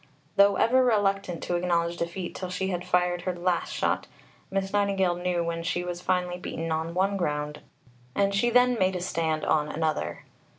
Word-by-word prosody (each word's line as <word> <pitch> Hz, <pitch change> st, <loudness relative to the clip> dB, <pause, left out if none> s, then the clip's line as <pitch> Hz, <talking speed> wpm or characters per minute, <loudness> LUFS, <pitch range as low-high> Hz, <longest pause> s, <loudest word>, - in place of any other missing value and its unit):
Though 200 Hz, 0 st, +6 dB
ever 255 Hz, +5 st, +4 dB
reluctant 195 Hz, -6 st, +1 dB
to 175 Hz, -, -1 dB
acknowledge 170 Hz, -1 st, +1 dB
defeat 175 Hz, +2 st, -4 dB
till 185 Hz, -, -5 dB
she 190 Hz, +1 st, -2 dB
had 180 Hz, -1 st, -2 dB
fired 180 Hz, -1 st, +1 dB
her 185 Hz, -1 st, -2 dB
last 175 Hz, 0 st, 0 dB
shot, -, -, 0 dB, 0.4 s
Miss 195 Hz, 0 st, -2 dB
Nightingale 195 Hz, -3 st, +2 dB
knew 175 Hz, 0 st, -1 dB
when 165 Hz, 0 st, -2 dB
she 175 Hz, +1 st, -1 dB
was 175 Hz, 0 st, -5 dB
finally 180 Hz, -1 st, 0 dB
beaten 165 Hz, -2 st, -4 dB
on 160 Hz, +1 st, -2 dB
one 195 Hz, +2 st, +1 dB
ground 150 Hz, -3 st, -2 dB, 0.6 s
and 200 Hz, 0 st, +2 dB
she 240 Hz, +4 st, +2 dB
then 245 Hz, 0 st, +4 dB
made 185 Hz, 0 st, +2 dB
a -, -, -1 dB
stand 160 Hz, -3 st, -1 dB
on 150 Hz, -1 st, +2 dB
another. 155 Hz, 0 st, -2 dB
180 Hz, 180 wpm, -27 LUFS, 170-195 Hz, 0.6 s, Though